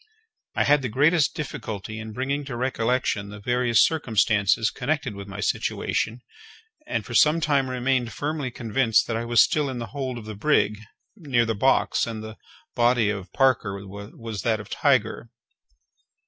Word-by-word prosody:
I - - +2
had 145 0 +4
the 125 - -3
greatest 145 +6 +3
difficulty 110 - -5
in 110 0 -7
bringing 135 +5 -2
to 135 -3 -6
recollection 120 -4 -1
the 105 +1 -9
various 120 +1 +3
circumstances 110 -7 +2
connected 135 -2 -2
with 100 0 -8
my 100 +1 -7
situation, 110 +3 -1 0.7
and 305 - -2
for - - -8
some 155 +2 +5
time 145 -4 +1
remained 125 -1 0
firmly 145 -2 -3
convinced 120 -1 +1
that 115 - -3
I 115 +1 -2
was 120 0 +5
still 150 -2 0
in 130 - -4
the 120 - -4
hold 130 -3 -3
of 115 - -9
the 110 - -6
brig, 105 -2 +1 0.4
near 135 - +1
the 115 - 0
box, 125 +3 +2
and 110 -2 -5
that 110 - -7
the 110 - -12 0.4
body 120 -3 +3
of 100 -3 -6
Parker 110 -7 +1
was 100 +1 -7
that 110 0 0
of 105 - -10
Tiger. - - +1
120 Hz, 170 wpm, -24 LUFS, 110-135 Hz, 0.7 s, some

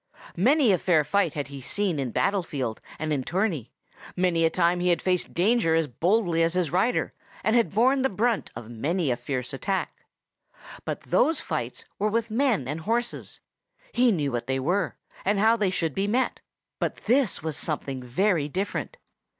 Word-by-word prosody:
Many 255 - +4
a 185 - +3
fair 160 -5 +3
fight 195 0 +1
had 145 -2 -3
he 140 -1 -8
seen 185 +3 -1
in 135 -2 -1
battle 195 - +1
field 130 -9 -4 0.2
and 155 0 -2
in 140 - 0
tourney; 165 - -1 0.4
many 180 -2 +2
a - - +4
time 175 +1 +2
he 180 - 0
had 175 - +3
faced 180 -1 -1
danger 185 -2 +3
as 165 -1 +2
boldly 170 - +1
as 165 +1 +2
his 180 -5 0
rider, 190 +8 +1 0.3
and 220 - +2
had 235 -1 +3
borne 260 +5 +4
the 265 - +2
brunt 220 +2 0
of 115 -1 -8
many 145 +7 -1
a - - +2
fierce 125 0 -4
attack. 190 +8 -3 0.8
But - - -3
those 320 0 +2
fights - - -4
were 210 +2 +2
with 230 +1 -1
men 230 - +1
and 150 +4 -3
horses. 235 +5 -2 0.5
He 245 0 +4
knew 150 -8 0
what 120 -1 -3
they 135 0 0
were, 180 +7 0 0.3
and 205 +2 +1
how 220 +3 +5
they 210 -4 +1
should 165 -5 -1
be 195 +6 -1
met; 250 +5 0 0.4
but - - -1
this 245 - +2
was 160 -2 -2
something 140 -4 -3
very 150 +5 +1
different. 200 - -3
180 Hz, 185 wpm, -26 LUFS, 150-215 Hz, 0.8 s, how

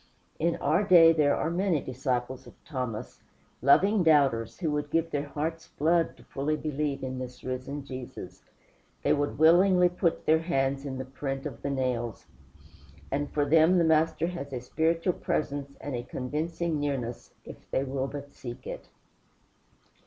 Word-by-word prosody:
In 170 +1 +1
our 160 +8 +1
day 170 -4 +7
there 150 -3 +3
are 160 - -1
many 180 -2 +1
disciples 130 0 -3
of - - -14
Thomas, 125 -7 -5 0.4
loving 195 - +5
doubters, 140 -9 +3
who 165 -4 -1
would 145 0 -2
give 165 +1 0
their 145 0 -2
hearts' 160 +3 -4
blood 165 +2 +2
to - - -17
fully 145 +3 -2
believe 150 -2 -2
in 130 0 -4
this 125 -1 -8
risen 130 +2 -4
Jesus; 130 -2 -8 0.6
they - - +3
would 145 0 -1
willingly 180 +3 +6
put 175 -1 -1
their 160 +1 +4
hands 135 -4 -1
in 130 -1 -4
the 130 - -4
print 135 +1 -5
of 135 -6 -6
the 140 - -2
nails; 125 -4 -2 0.9
and 145 +1 -1
for 145 -1 +1
them 160 +4 +5
the 170 - +4
Master 160 0 +2
has 170 -5 -5
a 130 - -3
spiritual 165 +7 0
presence 140 -3 -3
and 145 - -5
a 120 - -2
convincing 155 +6 -3
nearness, 130 -5 -4
if - - -12
they 135 - 0
will 135 0 -2
but 140 0 -8
seek 120 0 -9
it. - - -7
145 Hz, 165 wpm, -28 LUFS, 130-165 Hz, 0.9 s, day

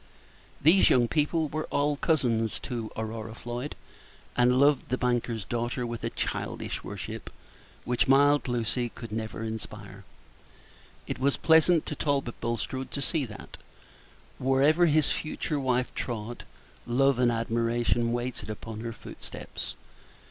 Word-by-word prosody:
These 165 +7 +6
young 120 -2 +4
people 155 +3 +1
were 155 +2 -3
all 145 +1 +1
cousins 120 -8 +1
to 115 -4 -4
Aurora 110 0 -4
Floyd, 120 +4 -5 0.6
and 125 +1 +4
loved 140 -2 +4
the 130 - +1
banker's 120 -4 0
daughter 120 +1 -2
with 120 -1 -5
a - - 0
childish - - -3
worship, - - -6 0.6
which 125 0 +1
mild 145 +2 +5
Lucy 120 0 0
could 115 -1 -9
never 110 0 -4
inspire. 105 -3 -7 1.0
It - - -4
was 140 +1 +2
pleasant 160 0 +5
to - - -4
Talbot 140 -5 -1
Bulstrode 125 +3 -2
to 140 - -4
see 140 +1 0
that, 110 - -10 0.8
wherever 140 +6 +4
his 155 -2 +4
future 155 -1 -2
wife 130 -1 0
trod, 120 0 -4 0.4
love 135 +1 +3
and 120 -1 +4
admiration 115 +1 +1
waited 120 -2 -3
upon 110 +1 -6
her 115 +1 -4
footsteps. - - -8
125 Hz, 135 wpm, -28 LUFS, 115-140 Hz, 1.0 s, These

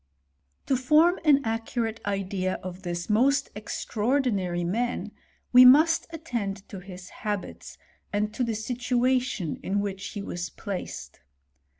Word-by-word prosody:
To 270 - +2
form 305 +8 +4
an 285 -4 +4
accurate 225 0 -2
idea 195 -2 -1
of 185 0 -7
this 175 -2 -4
most 270 +6 +2
extraordinary 210 -4 -1
man, 235 +8 -2 0.4
we 250 +1 +10
must 310 +6 +6
attend 235 -12 -4
to 195 - -7
his 185 -1 -10
habits, 205 -3 -5 0.3
and 210 +1 -1
to 250 - -1
the 230 -2 -1
situa 250 +3 +1
tion 185 - -4
in 200 +2 -1
which 195 -1 -3
he 205 - -6
was 175 -2 -4
placed. 200 - -6
220 Hz, 130 wpm, -26 LUFS, 195-255 Hz, 0.4 s, we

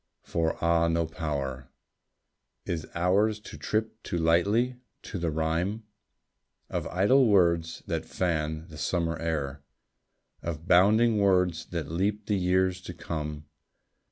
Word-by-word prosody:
For 80 -1 -1
ah, 85 0 +3
no 85 0 +1
power 70 -6 -4 1.0
Is 80 -2 -3
ours 100 +5 +2
to - - -10
trip 110 +1 -2
too 85 - -3
lightly 100 +10 +2 0.3
to 100 - -5
the 85 -1 0
rhyme 80 +7 -1 0.9
Of - - -2
idle 120 +8 +4
words 85 -5 +2
that - - -3
fan 80 -3 -1
the 75 -1 -10
summer 85 +1 -1
air, 70 -4 -2 0.8
Of 85 0 -5
bounding 105 +5 +5
words 90 -4 +2
that 80 -4 -4
leap 100 +5 -1
the 105 - +1
years 95 0 +1
to 90 -1 -8
come. 75 -3 -5
85 Hz, 130 wpm, -28 LUFS, 80-100 Hz, 1.0 s, bounding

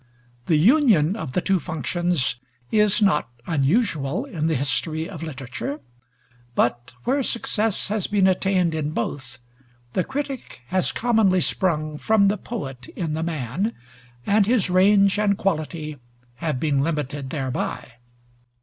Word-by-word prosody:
The 165 - +4
union 205 - +4
of 160 - -5
the 180 - +1
two 190 0 +2
functions 165 -2 -1 0.3
is 210 0 +3
not 150 -11 +2 0.2
unusual 160 - +1
in 165 - -2
the 160 - +1
history 155 +4 0
of 180 -6 -8
literature; 140 -1 -5 0.8
but 120 +1 0
where 275 +3 +1
success 225 -4 0
has 210 -2 -1
been 205 -2 +2
attained 185 -2 +2
in 155 -1 -2
both, 125 -1 -4 0.6
the 185 - +1
critic 270 - -5
has 185 +1 +1
commonly 220 -6 +3
sprung 155 -4 -1
from 210 -2 +4
the 210 - 0
poet 135 - -6
in 165 -4 -2
the 160 - -2
man, 165 - -2 0.5
and 205 0 +3
his 225 -6 +2
range 195 +2 +4
and 200 -2 +2
quality 155 -4 -2 0.4
have 155 -4 -2
been 140 -2 +1
limited 145 -3 -2
thereby. 130 -2 -3
170 Hz, 135 wpm, -23 LUFS, 150-205 Hz, 0.8 s, The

